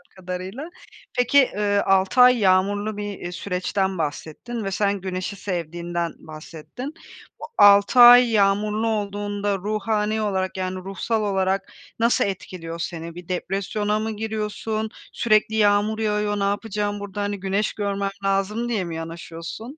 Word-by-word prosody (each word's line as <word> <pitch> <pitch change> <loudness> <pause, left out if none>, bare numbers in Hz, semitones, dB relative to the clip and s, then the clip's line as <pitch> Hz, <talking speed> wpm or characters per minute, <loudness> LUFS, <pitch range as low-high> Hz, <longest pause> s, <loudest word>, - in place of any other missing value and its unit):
kadarıyla. 185 - -6 0.5
Peki, 250 +3 +3
eee, 205 -5 +1
6 195 +5 +3
ay 250 0 +7
yağmurlu 205 +2 +2
bir, 205 0 -4
eee, 175 - -6
süreçten 190 +1 -2
bahsettin 160 +9 -4
ve 195 - -3
sen 200 -1 0
güneşi 185 +1 -4
sevdiğinden 175 -2 -3
bahsettin. 160 - -9 0.5
Bu - - -11
6 200 +4 +6
ay 245 0 +9
yağmurlu 210 +2 +2
olduğunda 205 -1 -2
ruhani 215 +2 -1
olarak, 190 -2 -1
yani 185 0 -2
ruhsal 195 +4 -2
olarak 195 -1 0 0.3
nasıl 235 +1 +3
etkiliyor 175 -4 -6
seni? 165 0 -5
Bir 175 -1 -10
depresyona 200 +3 -1
mı 220 +1 -2
giriyorsun? 220 0 -3 0.2
"Sürekli 215 -1 +2
yağmur 210 +1 +2
yağıyor, 210 -1 0
ne 200 - 0
yapacağım 205 0 -2
burada? 205 0 -5
Hani 205 0 -2
güneş 195 +2 -1
görmem 200 -1 -2
lazım," 195 +4 0
diye 220 -5 0
mi 170 -2 -5
yanaşıyorsun? 165 - -7
205 Hz, 135 wpm, -23 LUFS, 185-215 Hz, 0.5 s, ay